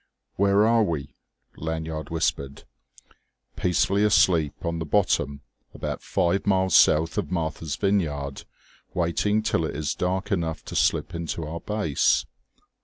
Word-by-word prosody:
"Where 100 +2 +3
are 115 0 +4
we?" 75 -8 -2 0.4
Lanyard 80 0 -4
whispered. 70 -4 -2 0.9
"Peacefully 90 +4 +1
asleep 85 -7 +2
on 85 0 -2
the - - -2
bottom, 70 -6 +1 0.3
about - - -4
five 95 +1 0
miles 95 -1 +2
south 80 +2 +4
of - - -4
Martha's 80 -3 -2
Vineyard, 75 -9 -1 0.5
waiting 105 +5 +1
till 110 -7 0
it 80 - -3
is 75 0 -2
dark 95 +2 -2
enough 85 -4 -2
to - - -7
slip - - +1
in 85 0 -4
to 80 - -3
our 80 +2 -5
base." 105 -9 +1
85 Hz, 135 wpm, -25 LUFS, 80-100 Hz, 0.9 s, are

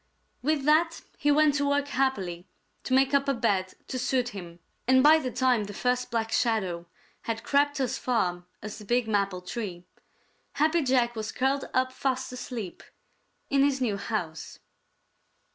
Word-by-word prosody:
With 295 +1 0
that 325 +3 +3 0.2
he 290 - +1
went 300 0 +5
to 285 -1 +1
work 285 0 +1
happily 190 -12 -1 0.4
to 255 - +2
make 270 +1 +3
up 280 0 +3
a 275 - +2
bed 195 -5 0
to 255 - -3
suit 250 -1 0
him, 175 -6 -9 0.3
and 260 0 +5
by 310 +2 +7
the 260 -4 -3
time 250 -3 +2
the 205 0 -8
first 250 +2 0
Black 225 -1 -1
Shadow 190 -9 0 0.4
had 225 -1 -2
crept 285 0 +2
as 260 -2 -1
far 180 -8 0 0.2
as 215 +1 -6
the - - -10
big 240 +2 +1
maple 200 -3 0
tree, 180 -3 -5 0.7
Happy 315 +3 +2
Jack 250 -3 +2
was 220 0 -4
curled 270 +1 0
up 255 0 +1
fast 260 -1 -2
asleep 235 -7 -6 0.7
in 275 0 +4
his 280 -1 +2
new 225 -6 0
house. 195 -6 -4
250 Hz, 165 wpm, -27 LUFS, 205-275 Hz, 0.7 s, by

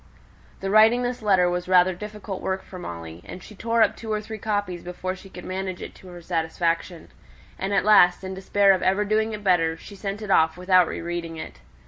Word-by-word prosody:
The 195 0 -2
writing 220 +3 +5
this 245 0 -3
letter 190 -4 +3
was 180 0 -2
rather 185 0 +5
difficult 210 0 -7
work 190 0 -2
for 185 - -10
Molly, 85 - -8
and 180 - -10
she - - -12
tore 230 +2 +2
up 215 - +1
two 225 -1 -7
or 215 - 0
three 215 +1 -8
copies 205 -4 -2
before 185 +1 -5
she 195 +1 -14
could 180 -1 -10
manage 185 -1 -4
it - - -8
to 185 - -16
her 175 -1 -11
satisfaction; 165 0 -2 0.5
and 195 +1 -2
at 200 - +2
last, 190 -4 +5
in 190 0 -5
despair 195 +1 +3
of 185 - -1
ever 195 +3 +2
doing 215 +1 +1
it 210 -1 -6
better, 165 -4 +2
she 200 - -12
sent 200 +2 -5
it 205 - -4
off 160 -1 +3
without 180 -1 +4
re - - -5
reading 170 -1 -5
it. - - -8
190 Hz, 220 wpm, -24 LUFS, 175-210 Hz, 0.5 s, writing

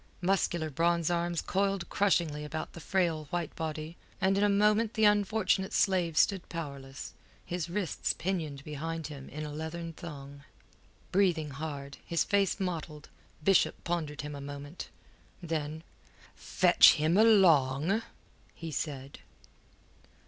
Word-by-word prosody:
Muscular 175 -4 0
bronze 170 +3 +1
arms 170 -1 0
coiled 195 -2 0
crushingly 170 -7 +1
about 155 +1 -5
the - - -9
frail 170 -3 0
white 170 +1 -4
body, 160 +1 -5 0.2
and 190 +1 +2
in 200 - +2
a 205 - +4
moment 210 +2 +3
the 220 - +4
unfortunate 205 -2 +2
slave 180 -5 +2
stood 195 -3 +2
powerless, 140 -5 -7 0.3
his 175 -1 -3
wrists 185 -2 -1
pinioned 160 -6 -3
behind 160 +2 -5
him 135 -2 -10
in 155 +2 -6
a 150 - -6
leathern 165 +2 -5
thong. 140 -3 -9 0.7
Breathing 175 -6 +2
hard, 140 -1 -6
his 170 - 0
face 200 0 +1
mottled, 160 -5 -4 0.3
Bishop 195 +2 +4
pondered 160 -4 -2
him 145 0 -6
a 140 - -7
moment. 145 +3 -8 0.5
Then: 160 -2 -4 0.5
"Fetch - - +5
him 155 +3 +1
along," 185 -4 +4 0.5
he 165 -1 -7
said. 140 -3 -5
165 Hz, 130 wpm, -30 LUFS, 150-190 Hz, 0.7 s, Fetch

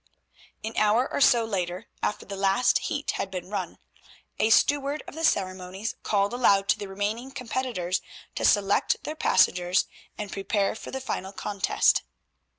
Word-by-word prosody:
An 220 +1 -4
hour 215 +4 +3
or - - 0
so 240 -3 +5
later, 185 -1 -3 0.2
after - - -2
the 200 - -6
last 195 +5 +3
heat 290 -1 -2
had 195 - -3
been 185 0 -6
run, 210 - -3 0.6
a 220 - +3
steward 285 +5 +3
of - - -8
the 325 +2 -6
ceremonies 190 - -1
called 200 +1 +1
aloud 200 -5 +3
to - - +3
the 205 - -5
remaining 205 +6 -3
competitors 250 -8 -2 0.3
to - - -4
select 200 -1 +3
their 305 - -4
passengers 180 - +3 0.3
and 210 -1 -5
prepare 195 0 0
for - - -9
the 265 - -5
final 195 -6 -4
contest. 200 0 +1
205 Hz, 155 wpm, -26 LUFS, 195-245 Hz, 0.6 s, so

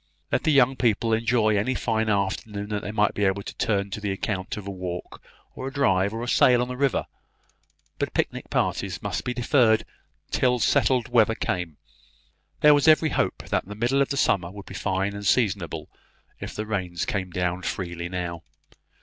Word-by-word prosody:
Let - - 0
the 155 - +4
young 135 -2 +4
people 115 -1 +1
enjoy 115 -1 +2
any 110 +6 0
fine 110 -2 0
afternoon 100 +1 -2
that 105 -1 -2
they 105 - -5
might 105 -1 +2
be 105 - -1
able 100 +1 0
to - - -7
turn 100 -2 -1
to 105 - -5
the 105 -1 -1
account 95 0 -3
of 105 - -7
a 100 - -4
walk, 90 -2 -6 0.3
or 130 - -6
a - - -4
drive, 100 -8 +2
or 115 +2 -4
a - - -4
sail 125 0 +5
on - - -4
the 125 - -4
river; 135 0 +1 0.9
but - - -2
picnic - - -2
parties - - -1
must - - -2
be 125 - -3
deferred 120 -3 +3 0.5
till 125 -1 +2
settled 125 +1 +2
weather 115 -2 +4
came. 90 -8 -3 0.8
There 150 0 +8
was 145 +1 +3
every 155 0 +6
hope - - -1
that - - 0
the 105 - -7
middle 120 +5 +1
of 140 - +1
the 140 - -2
summer 90 -9 +2
would 100 +1 -10
be - - -10
fine 95 +1 -1
and 100 0 -7
seasonable, 105 -1 0 0.5
if - - -7
the 105 - -3
rains 90 -5 -2
came 95 -3 -2
down 90 +1 -2
freely 85 -2 -4
now. 90 -2 -4
105 Hz, 195 wpm, -25 LUFS, 95-125 Hz, 0.9 s, There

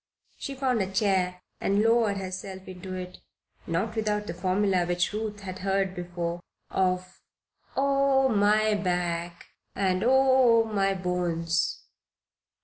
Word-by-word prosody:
She 275 - -5
found 260 -4 +1
a 190 0 -2
chair 185 -2 +1 0.2
and 200 +2 +2
lowered 225 -3 +3
herself 190 0 -6
into 185 0 -7
it, 180 0 -7 0.5
not 195 +7 -1
without 210 -1 0
the 170 - -4
formula 185 +1 +1
which 175 +2 0
Ruth 210 -1 -4
had 185 -1 -7
heard 195 0 0
before, 175 -1 -4 0.3
of 185 -1 -1 0.6
"Oh, 275 -1 +3
my 215 -1 +3
back 175 -3 -2 0.3
and 190 -1 +1
oh, 260 -2 +5
my 195 -3 0
bones!" 175 -2 -1
195 Hz, 125 wpm, -27 LUFS, 180-215 Hz, 0.6 s, oh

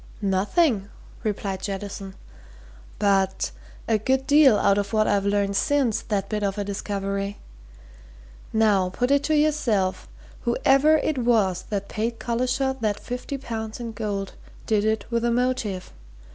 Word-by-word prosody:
"Nothing," 200 - +1 0.3
replied 195 -3 -2
Jettison. 195 -1 -5 0.8
"But 195 -2 +1 0.4
a 220 -2 +2
good 265 +4 +1
deal 285 -6 +6
out 200 0 +3
of 200 +1 -3
what 215 -1 +3
I've 200 -1 +1
learned 200 0 +1
since 265 0 +1
that 200 -2 -2
bit 210 0 -2
of 200 0 -1
a 205 - -1
discovery. 200 0 -3 1.1
Now, 210 -4 +3
put 245 +8 -1
it 280 0 +4
to 310 - +2
yourself 245 -11 +1 0.3
whoever 275 +5 +4
it 305 -2 -1
was 215 -7 +2
that 200 -1 -2
paid 230 +2 -2
Collishaw 255 +3 -1
that 210 -3 -1
fifty 250 +3 -5
pounds 220 -4 -5
in 235 -1 -5
gold 205 -3 -4 0.3
did 215 -1 +1
it 220 0 0
with 235 0 0
a 240 - +2
motive. 235 -6 -1
215 Hz, 145 wpm, -24 LUFS, 200-250 Hz, 1.1 s, deal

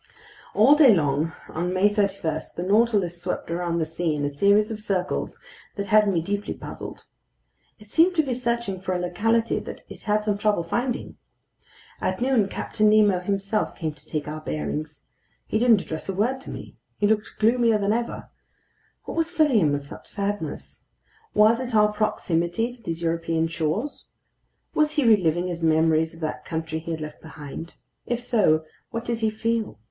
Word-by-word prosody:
All 230 +7 +7
day 285 -8 +7
long 150 0 +1 0.2
on 175 +3 -2
May 205 +3 +3
31, 195 -7 0
the 175 - -3
Nautilus 200 -4 +2
swept 180 -1 -3
around 170 0 -1
the 165 - +1
sea 165 0 -1
in 145 -1 -1
a 145 - -1
series 200 +8 +3
of 215 -1 -5
circles 190 -3 -2 0.4
that 200 - -3
had 210 +1 +5
me 170 -4 0
deeply 205 +3 -3
puzzled. - - -8 0.7
It 210 - -17
seemed 335 - +4
to 315 - +4
be 265 -3 -2
searching 235 -6 -2
for 185 0 -2
a - - -1
locality 225 +6 +1
that - - -8
it - - -11
had 210 0 +1
some 205 -1 0
trouble 205 -4 +2
finding. 240 +9 -2 0.8
At 185 - -1
noon 245 -5 +2
Captain 215 +2 +1
Nemo 210 -3 +5
himself 195 +3 -1
came 160 -3 -3
to 145 -1 -21
take 150 -2 -3
our 155 +1 -5
bearings. 150 -1 -4 0.4
He 215 - 0
didn't 230 -5 +5
address 160 +4 -6
a 195 - -2
word 250 +7 0
to - - -10
me. - - -9 0.2
He 210 - +1
looked 215 0 +1
gloomier 230 0 +3
than 205 0 +1
ever. 235 +1 -3 0.7
What - - -6
was 330 0 +1
filling 310 -9 +3
him 155 -6 +3
with 145 0 -2
such - - -11
sadness? 200 -6 -4 0.5
Was 220 +3 +5
it 250 -3 -3
our 210 0 +4
proximity 210 0 0
to 245 - -16
these 170 -4 -4
European 165 0 0
shores? 170 - -2 0.7
Was 305 0 +2
he 295 -4 +1
reliving 180 -6 +4
his 175 -2 -4
memories 160 0 +3
of 165 - -14
that 155 -1 -3
country 160 -1 -3
he 165 - -9
had 160 -1 -3
left 150 0 -7
behind? 160 +1 -9 0.3
If 240 0 -1
so, 205 -10 +2 0.3
what 230 +1 -4
did 235 -1 -2
he 220 -1 +2
feel? 225 +1 -2
200 Hz, 185 wpm, -25 LUFS, 165-225 Hz, 0.8 s, All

